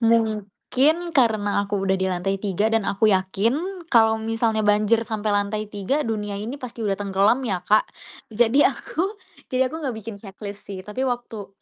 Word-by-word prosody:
mungkin 230 - +2 0.2
karena 210 -5 +2
aku 200 +1 -2
udah 190 0 +2
di 190 - 0
lantai 185 +1 -1
3 205 +1 0
dan 225 -2 +1
aku 215 +2 +2
yakin 230 - 0
kalau 225 -2 +5
misalnya 225 0 0
banjir 210 +2 +3
sampai 215 -1 -1
lantai 205 +1 -1
3 210 +9 0
dunia 210 -2 -2
ini 230 +7 -5
pasti 240 -2 -8
udah 195 -2 0
tenggelam 200 +5 +2
ya, 190 -6 -1
Kak. 210 +3 +4 0.5
Jadi, 240 +5 +3
aku 365 - -1 0.3
jadi 260 0 +2
aku 290 - -10
gak 250 -4 -2
bikin 220 -1 -7
checklist 200 0 -9
sih, 195 -2 -6
tapi 230 +5 -4
waktu 240 -5 -5
215 Hz, 170 wpm, -23 LUFS, 200-235 Hz, 0.5 s, kalau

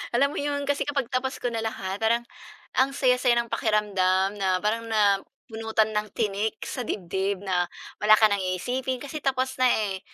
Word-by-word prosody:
Alam 280 +3 +3
mo - - -5
yun, 285 0 -1
kasi 285 0 0
kapag 280 -2 0
tapos 260 +1 -1
ko 245 - -2
na 225 - -2
lahat 200 -3 -4
parang 235 +2 +2 0.6
ang 265 +1 +4
saya-saya 250 -2 +3
ng 235 -1 -1
pakiramdam 200 -2 +1
na 185 -1 +2
parang 230 +2 0
na 205 -3 +3 0.3
bunutan 220 -1 0
ng 210 0 -1
tinik 215 0 -1
sa - - -5
dibdib, 190 +1 -2
na 180 -2 0 0.3
wala 215 +1 +7
ka 215 -1 +4
ng 200 - +1 0.2
iisipin, 255 +6 -3
kasi 285 +2 -5
tapos 265 -2 -1
na, 255 - +5
eh. 205 -5 0
220 Hz, 185 wpm, -26 LUFS, 200-255 Hz, 0.6 s, wala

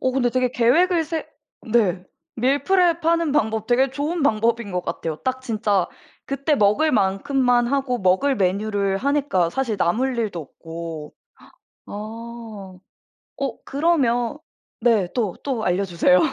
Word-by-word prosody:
근데 250 -2 +1
되게 255 0 +1
계획을 325 +9 +3
세 320 +1 -4 0.5
네. 190 -6 +2 0.3
밀프랩 335 +8 +2
하는 335 -2 +2
방법 220 -6 0
되게 250 +3 +3
좋은 295 +5 -2
방법인 230 -3 +1
것 180 -1 -3
같아요. 160 -2 -3
딱 260 0 -1
진짜 210 -6 0 0.4
그때 275 +3 0
먹을 255 +7 +3
만큼만 240 +5 +2
하고 265 -1 0
먹을 200 +8 +2
메뉴를 200 0 0
하니까 270 - +1
사실 240 0 -1
남을 245 +10 +1
일도 210 -6 -2
없고. 165 0 -8 0.7
아. - - -10 1.5
어 270 -4 -3
그러면 270 -6 +1 0.4
네. 225 -6 +3
또, 215 -7 0
또 255 -6 -2
알려주세요. 180 -1 +3
240 Hz, 250 characters per minute, -22 LUFS, 200-275 Hz, 1.5 s, 계획을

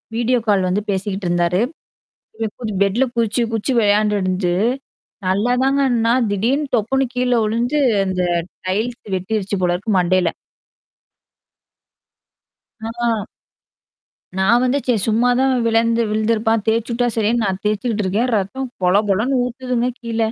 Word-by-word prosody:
Video 240 +1 +1
call 195 -3 +3
வந்து 200 +3 0
பேசிக்கிட்டு 195 -1 -2
இருந்தாரு. 175 +2 +1 0.8
இவன் 225 -1 -2
இப்டி 220 -3 -3
பெட்ல 205 +7 +1
குதிச்சு 230 +1 +1
குதிச்சு 225 +4 -1
விளையாண்ட்டுருந்துட்டு 205 -4 +1 0.7
நல்லாதாங்க 250 +8 +1
இருந்தான், 235 0 +2
திடீர்னு 255 +9 0
தொப்புனு 265 +5 +1
கீழ 250 0 0
விழுந்து 240 +7 0 0.3
அந்த 185 -1 -1 0.5
டைல்ஸ் 225 +6 -2
வெட்டிருச்சு 200 +1 -2
போல 175 0 +2
இருக்கு 210 +5 -3
மண்டையில. 180 -1 +2 2.6
ஆ. 235 +1 -1 1.3
நான் 230 +6 +4
வந்து 255 +2 +2
சரி 245 -4 +2
சும்மாதான் 245 +4 +2
விழுந் 230 0 +2 0.2
விழுந்துருப்பான், 220 0 +1
தேச்சு 230 +1 0
விட்டா 245 +1 +1
சரின்னு 225 +2 +1
நான் 190 -1 -2
தேச்சுக்கிட்டு 210 +1 -1
இருக்கேன், 220 +7 0
ரத்தம் 210 +7 -2 0.2
பொலபொலன்னு 210 +7 +2
ஊத்துதுங்க 250 0 -2
கீழ. 230 -1 -4
225 Hz, 120 wpm, -19 LUFS, 200-245 Hz, 2.6 s, நான்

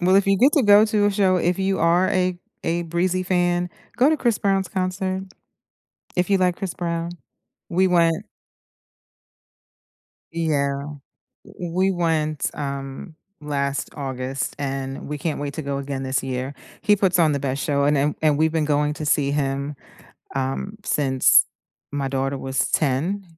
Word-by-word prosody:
well, 185 +2 +3
if 195 0 +4
you 195 -1 +3
get 275 +4 +5
to 290 - +4
go 205 0 +7
to 210 -1 +2
a - - +3
show, 195 -2 +3
if 175 +1 +1
you 195 0 0
are 170 +3 +3
a 185 -1 +1 0.2
a 170 +1 0
Breezy 175 +2 0
fan, 175 -1 +1 0.3
go 255 +4 +5
to 315 - +2
Chris 240 -6 +1
Brown's 195 -1 +1
concert. 185 0 -2 0.9
If 180 +1 +1
you 200 - +4
like 180 -1 +2
Chris 190 -3 -4
Brown. 170 -1 -3 0.6
We 185 +2 +2
went 165 -2 +2 2.1
Yeah. 140 -4 0 0.7
We 180 +2 0
went, 160 -4 0
um, 140 +2 -6 0.3
last 140 -1 -2
August, 130 -1 -4
and 135 0 -4
we 150 - -3
can't 155 +1 -2
wait 145 0 -4
to - - -3
go 140 -1 -3
again 140 -1 -4
this 130 0 -1
year. 130 +1 -3 0.3
He 210 -2 +4
puts 190 -3 +2
on 155 -3 +4
the 140 - -1
best 135 +1 -2
show, 140 -3 +1
and 145 +1 +3
and 145 +2 +1
and 150 -2 +3
we've 160 0 +2
been 160 -2 +1
going 150 0 +1
to 155 +1 -6
see 140 -1 +2
him, 140 0 -1 0.6
um, 135 +10 -2
since 135 -7 +4 0.5
my 140 -1 -2
daughter 135 0 -1
was 135 0 -1
10. 160 +8 0
160 Hz, 165 wpm, -23 LUFS, 140-185 Hz, 2.1 s, go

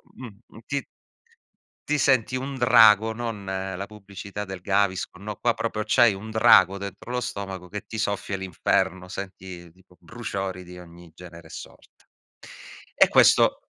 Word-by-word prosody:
mhmm, 115 -2 -13
ti 140 -3 -3 1.0
ti 150 - 0
senti 130 -3 +2
un 135 +2 -5
drago, 110 -3 +6
non 115 -3 -5
la 95 0 -4
pubblicità 100 0 -8
del 95 -1 -7
Gaviscon. 95 -1 -1
No, 105 0 -5
qua 120 - +1
proprio 110 -2 -3
c'hai 120 0 +4
un 110 +3 -9
drago 110 -4 +5
dentro 100 +4 -8
lo 125 0 -1
stomaco 95 -5 -6
che 105 +2 -7
ti 110 - -8
soffia 100 -2 -2
l'inferno, 95 0 -1
senti 95 -3 -8
tipo 90 +1 -24
bruciori 95 -2 -5
di 90 0 -12
ogni 85 -1 -14
genere 85 -2 -12
e - - -19
sorta. - - -13 0.9
E - - +6
questo - - +5
100 Hz, 150 wpm, -24 LUFS, 95-110 Hz, 1.0 s, drago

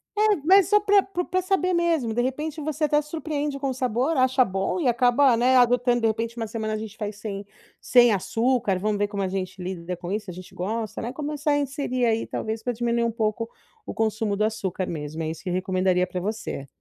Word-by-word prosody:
É, 425 0 +4
mas 380 0 +6
só 420 0 +6
pra 405 -1 +4
pro 360 -2 -3
pra 370 +1 0
saber 370 -1 +1
mesmo. 330 -9 +1
De 240 - +1
repente 300 +5 -3
você 305 +1 -1
até 295 +1 +2
se 300 - -15
surpreende 295 -3 -3
com 275 - -1
o 260 - -1
sabor, 255 +4 0
acha 260 0 +4
bom 195 - -2
e 285 - 0
acaba, 245 +2 +4
né, 255 +2 +3
adotando, 245 0 +3
de 225 - +3
repente 225 +2 -2
uma 225 - -3
semana 215 0 -3
a - - -1
gente 220 0 -8
faz 210 -2 -4
sem 200 -1 -6 0.3
sem 240 -2 +5
açúcar, 225 +1 +1
vamos 210 +1 0
ver 205 0 +1
como 200 -1 -4
a - - 0
gente 185 0 -4
lida 180 -1 -4
com 175 +1 -6
isso, 210 +1 -2
se 185 - -6
a - - -9
gente 185 +1 -11
gosta, 215 +3 -3
né, 240 +2 -4
começar 295 +1 -2
a 290 - +3
inserir 270 -3 -1
aí 225 0 +1
talvez 220 0 -4
pra 245 - -1
diminuir 235 0 0
um 230 - +1
pouco 225 0 -2 0.4
o - - -5
consumo 220 -1 0
do 210 - 0
açúcar 200 -4 -2
mesmo. 155 0 -5
É 155 - -2
isso 160 - -7
que 185 - -4
eu - - -1
recomendaria 185 0 +1
pra 180 - -4
você. 195 -8 -4
230 Hz, 240 wpm, -25 LUFS, 205-285 Hz, 0.4 s, mas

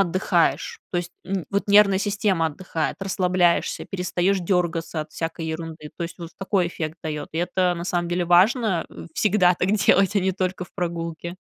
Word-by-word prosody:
отдыхаешь. 195 - +1
То 175 - -2
есть, 175 0 -5
н 190 -2 -2
вот 200 +1 -1
нервная 200 -2 +6
система 200 -5 +1
отдыхает, 160 0 -3
расслабляешься, 180 -2 +1
перестаешь 185 +1 0
дергаться 170 -2 -1
от 155 - -17
всякой 165 0 -4
ерунды. 160 -1 -6
То - - -4
есть, 170 - -8
вот 170 -1 -7
такой 195 -2 +1
эффект 160 -1 -5
дает. 150 -2 -4
И 160 - -3
это 180 +1 +1
на 170 0 -5
самом 175 -1 -1
деле 175 0 0
важно, 185 +2 +3
э, - - -10
всегда 190 -4 +3
так 185 +2 0
делать, 200 -1 +3
а - - +4
не 190 +1 +1
только 185 -1 -2
в - - -21
прогулке. 170 -1 -4
180 Hz, 185 wpm, -23 LUFS, 170-195 Hz, -, нервная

